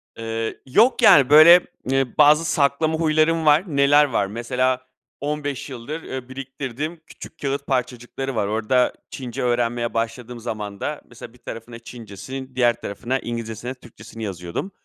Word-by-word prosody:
Eee, 115 0 -4
yok 225 - +3
yani, 175 - +7
böyle, 160 +4 +8 0.2
eee, 135 -2 0
bazı 150 +2 +6
saklama 155 +2 +1
huylarım 160 0 +2
var. 150 +3 +5
Neler 145 -1 +4
var: 115 -7 -1
Mesela 125 +4 -1 0.4
15 145 -1 -4
yıldır, 140 +6 -7
eee, 130 -1 -7
biriktirdiğim 135 +4 -6
küçük 160 - -12
kâğıt 140 0 -3
parçacıkları 125 +1 -3
var. 105 -2 0
Orada, 110 +4 +1 0.2
Çince 125 -1 -6
öğrenmeye 120 -1 0
başladığım 115 +1 -4
zamanda 110 +5 -5
mesela 115 0 -12
bir - - -19
tarafına 115 +1 -8
Çincesini, 125 +3 -9
diğer 120 -2 +2
tarafına 125 +6 -3
İngilizcesini, 115 +1 -5
Türkçesini 115 -2 -12
yazıyordum. 90 - -5
130 Hz, 135 wpm, -22 LUFS, 115-145 Hz, 0.4 s, böyle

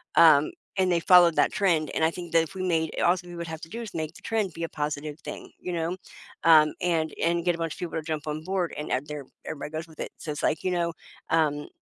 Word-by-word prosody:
um, 155 -3 +7 0.3
and 185 -1 +3
they 170 - +3
followed 175 -2 +7
that - - +3
trend, 170 -6 +2
and 160 - 0
I 165 - +2
think 175 -1 -8
that 165 -1 +5
if 165 - -9
we 185 - -3
made 160 -3 0
a - - 0
all's 175 0 +3
we 175 0 -10
would 170 0 -5
have 160 -1 -5
to 160 - -9
do 235 +2 -5
is 220 - -7
make 160 0 -3
the - - -13
trend 210 -6 -1
be 165 - -5
a 165 - -2
positive 150 0 -4
thing, - - -8
you 180 - -4
know, 170 +2 -1 0.5
um, 155 -2 +7
and 165 -3 0
and 170 0 +2
get 175 -1 +3
a - - -8
bunch 165 -2 -2
of - - -15
people 175 -2 -4
to - - -1
jump 155 -1 -4
on 155 +1 -3
board, 185 -1 -1
and, 150 - -4
uh, 130 - +2
they're 150 -2 -6 0.2
everybody 150 0 -5
goes 160 +1 -5
with 160 - -17
it, - - -5
so 155 - -5
it's, 145 - -5
like, 155 0 +1
you 185 - +2
know 170 -1 0 0.4
um, 150 -2 +1
165 Hz, 280 wpm, -27 LUFS, 155-175 Hz, 0.5 s, um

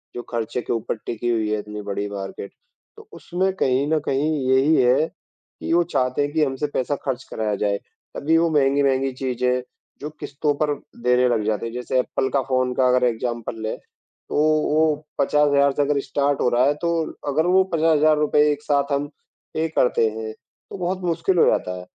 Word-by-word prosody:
जो 120 - -4
खर्चे 120 +1 -2
के 120 - -3
ऊपर 115 0 -2
टिकी 120 +1 -3
हुई 110 -2 0
है 110 - 0
इतनी 105 0 -7
बड़ी 100 0 -3
मार्केट, 100 0 -6 0.5
तो - - -14
उसमें 185 +2 -1
कहीं 135 -4 +1
न 155 - +3
कहीं 145 +4 0 0.2
यही 135 +4 +4
है, 130 +5 +3
कि - - -9
वो 175 +1 +4
चाहते 130 -5 -1
हैं 145 - -1
कि 160 -1 +2
हमसे 135 +2 -2
पैसा 130 +3 0
खर्च 130 -1 -2
कराया 105 -2 -1
जाए, 100 0 0 0.4
तभी 160 +3 +2
वो 165 0 +3
महँगी-महँगी 135 -2 +2
चीज़ें 125 -1 -1 0.4
जो 150 - -4
किश्तों 145 0 -1
पर 150 -1 +1 0.3
देने 125 0 +4
लग 115 -3 +1
जाते 110 0 -1
हैं। 115 - -5
जैसे 125 +1 -1
एप्पल 130 +1 -1
का 140 - +3
फ़ोन 130 -1 +1
का 130 - +3
अगर 125 0 +3
एग्ज़ाम्पल 115 -1 -3
लें, 110 - -3 0.5
तो - - -4 0.4
वो 155 +1 +3 0.4
50,000 150 +1 +3
हज़ार 140 0 +4
से 145 - 0
अगर 145 0 +1
स्टार्ट 140 +1 0
हो - - +3
रहा 120 +1 +3
है, 145 - +3
तो 165 +1 -1 0.2
अगर 150 +3 +1
वो 185 +1 +4
50,000 160 -1 +3
हज़ार 155 +1 +4
रुपए 150 0 +2
एक 145 0 -3
साथ 140 -1 0
हम 140 +1 0 0.5
पे 160 +1 0
करते 125 -6 +2
हैं, 110 0 -6
तो 135 - -14
बहुत 185 +1 -2
मुश्किल 170 +2 0
हो - - +6
जाता 90 - +1
है। 90 - -10
135 Hz, 200 wpm, -22 LUFS, 120-150 Hz, 0.5 s, हो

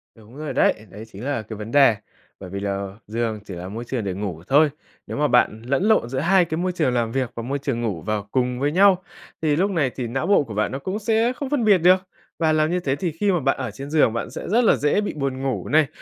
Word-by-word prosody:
Đúng 115 +4 -16
rồi 155 -1 -5
đấy, - - +4 0.2
đấy 105 +4 -10
chính 105 0 -11
là 140 -5 -1
cái 110 0 -8
vấn 105 +2 -7
đề. 135 -5 +6 0.4
Bởi 95 -2 -9
vì 100 - -5
là 100 0 -4
giường 110 0 -2
chỉ 100 - -8
là 90 +1 -7
môi 115 +4 -6
trường 120 -2 -3
để 95 -2 -2
ngủ 90 -4 -5
thôi. 150 +3 +5 0.4
Nếu - - -5
mà 150 +1 +2
bạn 110 -4 +2
lẫn 140 +7 0
lộn 215 - +3
giữa 130 +1 -2
hai 180 +4 +4
cái 160 -1 -3
môi 180 +2 0
trường 155 -8 0
làm 115 -2 0
việc 130 -1 -1
và 115 - -5
môi 140 +3 -2
trường 130 -4 -2
ngủ 100 -8 -2
vào 105 +2 -3
cùng 125 -1 0
với 145 +2 +1
nhau, 185 +1 +4 0.4
thì 150 -2 +2
lúc 195 +5 +1
này 155 -8 +1
thì 125 -3 -3
não 135 +7 -2
bộ 200 -7 +4
của 115 - -8
bạn 105 +1 0
nó 135 - -4
cũng 190 +8 -4
sẽ 225 +3 +1
không 275 -1 -5
phân 290 -5 0
biệt 205 -3 +6
được. 180 +2 +5 0.4
Và 160 -2 +2
làm 155 +1 +2
như 180 - +1
thế 135 -6 -1
thì 165 +4 -2
khi 195 +6 0
mà 175 - +1
bạn 135 -1 +1
ở 130 -4 -4
trên 135 +7 -8
giường, 150 -7 +3
bạn 115 - -3
sẽ - - -7
rất 235 +4 +3
là 225 - +5
dễ 150 +8 +1
bị 205 - -3
buồn 135 -3 -3
ngủ 135 -2 -2
này. 155 -1 +4
135 Hz, 280 wpm, -22 LUFS, 115-170 Hz, 0.4 s, đề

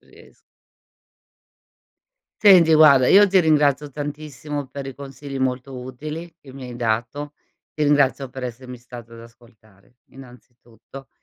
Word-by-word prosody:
Ries - - -20 2.0
Senti, 180 -6 +6
guarda, 140 -4 +6
io 205 +1 +7
ti 195 0 +2
ringrazio 150 -2 +1
tantissimo 145 -1 -6
per 140 +2 -8
i 135 - -8
consigli 140 0 -9
molto 130 0 -3
utili 150 +7 -8
che 135 -4 -15
mi 135 - -10
hai 120 - -9
dato. 120 +6 -3 0.4
Ti 150 - -2
ringrazio 145 -2 +1
per 130 0 -9
essermi 125 +1 -8
stato 120 -1 -13
ad 115 - -12
ascoltare, 115 -2 -20 0.2
innanzitutto, 125 0 -16
135 Hz, 130 wpm, -21 LUFS, 125-150 Hz, 2.0 s, io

